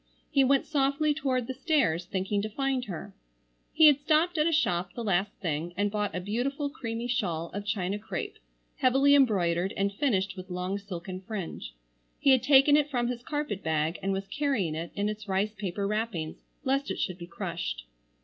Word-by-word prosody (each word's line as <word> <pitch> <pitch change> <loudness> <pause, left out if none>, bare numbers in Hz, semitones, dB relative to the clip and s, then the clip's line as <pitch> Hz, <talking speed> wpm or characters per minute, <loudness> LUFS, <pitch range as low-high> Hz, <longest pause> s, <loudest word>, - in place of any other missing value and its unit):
He 275 - +4
went 270 +1 +3
softly 290 +1 +1
toward 260 -5 -1
the 260 - -4
stairs 265 - +1
thinking 195 +2 -1
to 215 - -3
find 265 +2 -1
her. 195 +1 -7 0.6
He 320 - +6
had 290 -2 +7
stopped 315 +3 +2
at 305 - +4
a - - +2
shop 180 - +1
the 235 - -4
last 195 -1 +1
thing 170 -1 -3
and 205 +1 +1
bought 205 -5 -1
a - - -1
beautiful 260 +9 -2
creamy 230 -5 -4
shawl 180 -10 -1
of 205 +1 -5
China 200 0 -1
crêpe 215 - -5 0.4
heavily 270 +3 +4
embroidered, 190 -9 +3
and 200 0 +1
finished 195 -6 0
with 185 0 -9
long 180 +2 -2
silken 185 -2 -7
fringe. 185 - -6 0.4
He 275 - +5
had 260 -2 +5
taken 280 +1 +6
it 295 0 +3
from 245 -3 0
his 245 -1 -4
carpet 290 - -3
bag 160 +1 0
and 195 - -1
was 195 0 -2
carrying 265 - 0
it 165 +2 -4
in 205 0 0
its 215 0 -5
rice 200 +2 0
paper 200 -1 -3
wrappings 210 -6 -2 0.3
lest 275 0 0
it - - -2
should 185 0 -2
be 170 - -8
crushed. - - -4
210 Hz, 190 wpm, -28 LUFS, 185-270 Hz, 0.6 s, had